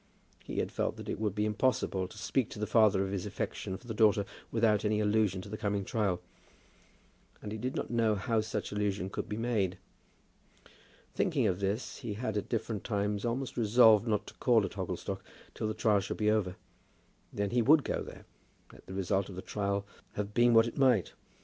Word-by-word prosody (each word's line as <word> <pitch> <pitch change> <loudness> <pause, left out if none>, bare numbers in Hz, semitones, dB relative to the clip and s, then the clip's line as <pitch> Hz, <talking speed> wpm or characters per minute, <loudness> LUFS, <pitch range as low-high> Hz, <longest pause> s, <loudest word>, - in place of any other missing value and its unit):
He - - -6
had - - -1
felt - - -1
that - - -9
it - - -3
would 105 -3 -1
be 105 0 +1
impossible 105 -4 0
to 105 - -14
speak 115 +4 0
to - - -9
the 105 - -1
father 105 -3 +4
of 95 - -4
his 95 -3 -3
affection 95 - -4
for 120 - -19
the 115 - -4
daughter 105 -2 +4 0.3
without 110 -2 +3
any 105 0 +1
allusion 105 -3 +1
to - - -10
the 110 - -6
coming 100 -2 -1
trial; 100 -5 0 1.2
and 105 - -7
he 110 - -4
did 130 +4 -3
not - - -3
know 115 -2 +2
how 110 +2 0
such 105 -1 -4
allusion 100 -2 -1
could 110 - -4
be 105 - -3
made. 110 -6 0 1.4
Thinking - - +1
of 90 - +1
this, 100 +4 -2
he 110 -4 -5
had 110 -1 -3
at 105 - -2
different 115 -2 -2
times 105 -1 -1
almost 120 +1 -2
resolved 110 -1 +6
not 105 -2 0
to - - -11
call 115 -5 +3
at - - -5
Hogglestock - - -4 0.3
till 110 - -3
the 110 - -2
trial 105 -3 +3
should 100 - -4
be 105 0 +2
over. 95 -4 0 0.8
Then 100 -1 -2
he 120 0 +3
would 150 +5 +6
go - - -2
there, - - -10 0.5
let - - -17
the 95 - -7
result 95 +1 0
of 95 - -8
the 95 - -6
trial 100 -1 -2 0.3
have 105 0 -4
been 120 0 +4
what 115 0 +7
it 120 - -5
might. 125 - +3
105 Hz, 205 wpm, -31 LUFS, 100-115 Hz, 1.4 s, what